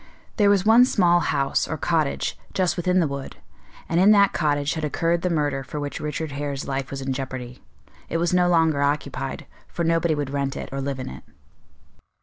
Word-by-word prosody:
There 205 -3 +4
was 200 -1 +3
one 225 +3 +7
small 175 -8 +3
house, 145 -4 0
or 160 - -3
cottage, 155 -2 0 0.2
just 185 -2 +1
within 180 +1 +1
the 165 - +2
wood, 140 -1 -6 0.5
and 170 - +1
in 190 +3 +6
that 200 -1 +4
cottage 145 -2 0
had 160 - -4
occurred 165 +3 0
the 180 - 0
murder 145 -5 0
for 150 +3 -6
which 145 -1 -4
Richard 150 0 -4
Hare's 140 -1 -4
life 135 -1 -3
was 135 -1 -5
in 135 0 -2
jeopardy. 130 -2 -6 0.5
It - - -1
was 170 +1 0
no 180 -1 +3
longer 160 -4 +3
occupied, 145 +1 -2 0.2
for 170 - -4
nobody 165 -1 +2
would 145 -2 -3
rent 140 -1 -2
it - - -6
or 135 0 -3
live 135 -1 -3
in 130 - -5
it. 65 - -9
150 Hz, 200 wpm, -23 LUFS, 140-175 Hz, 0.5 s, one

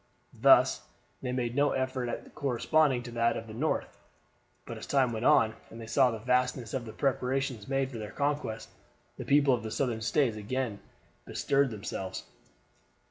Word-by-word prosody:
Thus, - - +5
then, - - -25 0.3
they 125 - -3
made 120 0 -3
no 145 +1 +3
effort 130 -1 -2
at - - -4
all - - -15
corresponding 135 0 +1
to 120 - -8
that 115 0 +1
of 115 - -6
the 110 - -10
North; 150 +8 -2 0.7
but - - -6
as - - -9
time 130 -4 +2
went 110 +2 -3
on, 110 -2 +5 0.2
and 115 - -11
they 115 - -7
saw 130 +3 +3
the 115 - -3
vastness 125 -1 0
of 130 -3 -2
the 110 - -7
preparations 135 -3 -1
made 135 0 0
for 115 - -6
their 105 -1 -6
conquest, 140 -1 -2 0.5
the - - -6
people 140 -1 +4
of 120 - 0
the 110 - -5
Southern 115 -1 -1
States 115 +1 +1
again 110 0 -3 0.5
bestirred 140 -1 +1
themselves. 95 -3 -5
125 Hz, 185 wpm, -29 LUFS, 115-135 Hz, 0.7 s, Thus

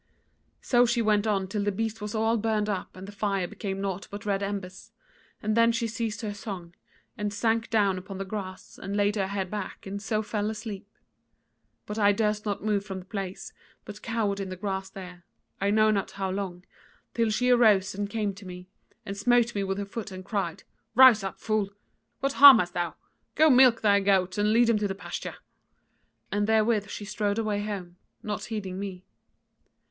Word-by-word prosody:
"So 245 -1 +4
she 235 +1 +1
went 215 0 +2
on 195 -3 0
till 205 +1 -2
the 205 - +1
beast 225 +2 -3
was 210 +1 -4
all 225 +1 +2
burned 215 -1 0
up 200 -3 -4
and 190 +1 -9
the - - -8
fire 200 -3 -1
became 195 +1 -5
naught 195 -1 -3
but 205 0 -8
red 200 -1 0
embers, 195 -2 -5 0.5
and 215 0 0
then 230 0 +5
she 230 0 -1
ceased 225 -1 -3
her 210 -2 -3
song 190 -4 -7 0.5
and 210 0 -1
sank 225 +2 0
down 200 -4 +2
upon 190 +1 -8
the 195 - -4
grass, 190 -2 -7
and 195 +1 -4
laid 205 +1 +2
her 195 -2 0
head 195 -2 -3
back 210 -2 -5
and 200 +1 -5
so 215 +1 -1
fell 210 0 -2
asleep; 210 -2 -6 1.0
but 210 +1 -5
I 205 -1 +5
durst 210 0 0
not 205 0 -2
move 210 -2 +1
from 195 -2 -6
the 185 - -9
place, 195 -1 -6 0.3
but 215 - -9
cowered 220 -3 -1
in 195 -1 -4
the 185 - -5
grass 190 0 -3
there, 180 -2 -10 0.4
I 200 - +2
know 215 +1 +4
not 200 -3 0
how 195 -1 -3
long, 185 -2 -4 0.5
till 230 -1 +1
she 250 +4 +2
arose 215 -6 +4
and 200 +1 -3
came 210 -2 -1
to 200 +1 -13
me, 180 0 -9 0.4
and 195 - -5
smote 240 +3 +3
me 200 - -1
with 195 0 -2
her 200 - -3
foot 210 +1 -6
and 185 0 -8
cried: 195 -6 -3 0.3
'Rise 250 -5 +8
up, 195 - -5
fool! 215 -3 0 0.5
what 275 0 0
harm 280 -3 +10
hast 180 -4 -1
thou? 175 -1 -2 0.4
Go 315 0 +6
milk 255 -2 +6
thy 200 -2 +4
goats 190 -1 +1
and 210 +1 +3
lead 235 +2 +5
them 230 -2 +2
to 200 -2 -1
pasture.' 200 - -6 0.9
And 205 0 0
therewith 220 -1 +2
she 205 - -6
strode 205 0 -1
away 210 -2 -1
home, 185 -4 -6 0.3
not 210 -1 -4
heeding 195 -4 -5
me. 190 -2 -6
205 Hz, 200 wpm, -27 LUFS, 195-220 Hz, 1.0 s, harm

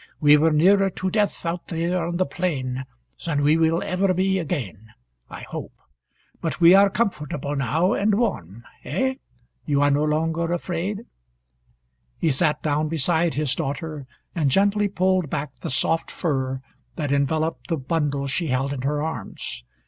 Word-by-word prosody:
"We 150 -1 +7
were 155 +2 +4
nearer 195 +6 +4
to 185 0 -3
death 210 -3 0
out 170 +1 -3
there 170 +1 -1
on 175 0 -2
the 185 - +2
plain 130 -9 -2 0.4
than 145 -4 0
we 150 +2 +5
will 165 +1 +2
ever 185 0 +1
be 190 +1 +1
again, 125 - -4 0.4
I - - -8
hope. - - -7 0.7
But 165 - -3
we 170 +1 +8
are 200 +1 +7
comfortable 150 - -2
now, 155 - +1
and 205 -2 +2
warm. 120 - -2 0.2
Eh? 260 - -1 0.5
You 145 -1 +2
are 145 - +4
no 145 +1 +2
longer 165 +2 0
afraid?" 180 +4 -3 1.2
He 160 - +1
sat 150 +2 +1
down 150 0 +1
beside 165 +2 +1
his 145 -3 0
daughter, 150 -1 -4 0.3
and 155 -5 +1
gently 205 +6 +3
pulled 185 -4 +1
back 140 -2 -4
the - - -5
soft 160 +4 +1
fur 130 -5 -2 0.3
that 145 -3 -2
enveloped 155 +3 0
the 165 - 0
bundle 145 0 -1
she 160 +5 -1
held 135 +1 0
in 135 - -4
her 145 +2 -1
arms. 105 - -5
160 Hz, 160 wpm, -23 LUFS, 140-180 Hz, 1.2 s, we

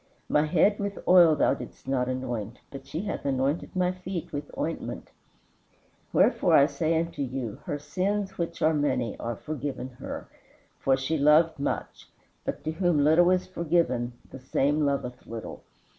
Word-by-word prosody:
My 150 +1 +2
head 185 +6 +3
with 200 0 -3
oil 175 -4 +7
thou - - +3
didst 140 - -9
not 130 -2 0
anoint, 120 -4 -3
but 135 -1 -9
she 160 - -3
hath 210 - -4
anointed 140 +5 -1
my 180 -1 +2
feet 180 -2 -6
with 145 0 -4
ointment. 60 - -4 1.0
Wherefore, - - +4
I 140 - +7
say 155 +3 0
unto 165 -2 -3
you, 130 -5 -4
her 145 - -2
sins, 195 +6 -2
which 170 -1 -3
are 160 +1 +4
many, 130 -6 0
are 115 0 -3
forgiven 145 -1 -5
her, - - -6 0.5
for 135 -1 +2
she 145 +4 -1
loved 155 +2 +5
much; 140 - -4 0.3
but - - -4
to 155 - -1
whom 160 -3 +2
little 165 +4 +5
is 185 0 +2
forgiven 155 -9 0 0.2
the 135 - -9
same 145 +3 +1
loveth 125 -3 -3
little. 115 -1 -7
150 Hz, 160 wpm, -27 LUFS, 130-170 Hz, 1.0 s, oil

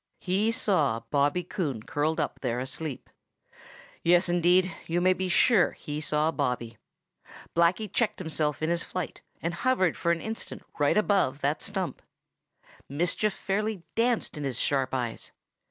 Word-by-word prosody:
He 200 +4 +1
saw 150 - +2
Bobby 145 +4 +2
Coon 140 - -3
curled 155 +5 -1
up - - -2
there 120 -2 -1
asleep. 135 +2 -4 0.9
Yes, 175 +1 +4
indeed, 175 +1 +3
you 170 +1 +1
may 185 +1 +4
be 185 0 -3
sure 200 +2 +4
he 150 0 -5
saw 150 +1 +1
Bobby. 125 -6 -2 0.8
Blacky 170 +6 +3
checked 215 +2 0
himself 155 -3 -1
in 160 - +1
his 170 0 +2
flight 185 -2 -5 0.2
and 170 +1 -1
hovered 190 -3 +1
for 170 - 0
an 170 - +1
instant 220 +4 -5 0.2
right 145 +5 +3
above 195 -10 +2
that 145 +3 0
stump. 195 -3 -3 0.9
Mischief 175 +8 +1
fairly 205 -1 -2
danced 235 -3 +1
in 150 - -4
his 135 -3 -2
sharp 135 -2 +1
eyes. 120 -3 -4
170 Hz, 150 wpm, -28 LUFS, 145-190 Hz, 0.9 s, Yes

